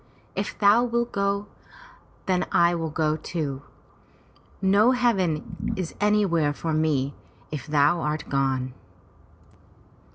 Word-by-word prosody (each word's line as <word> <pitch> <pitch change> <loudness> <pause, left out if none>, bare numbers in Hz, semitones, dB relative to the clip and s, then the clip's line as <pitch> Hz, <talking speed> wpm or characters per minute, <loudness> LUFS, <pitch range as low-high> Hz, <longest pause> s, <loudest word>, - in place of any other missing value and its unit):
If - - -3
thou 210 +3 +5
wilt 235 0 -1
go, 200 0 0 0.8
then 180 -2 0
I 170 0 +4
go 155 -2 -1
too. 145 -5 -4 1.0
No 205 +6 +4
heaven 195 -11 0
is 180 -3 -4
anywhere 195 -8 +2
for 160 +2 -3
me, 145 -3 +1 0.4
if 150 -5 -5
thou 150 +3 +3
art 150 0 -2
gone." 135 -2 0
170 Hz, 105 wpm, -25 LUFS, 150-200 Hz, 1.0 s, thou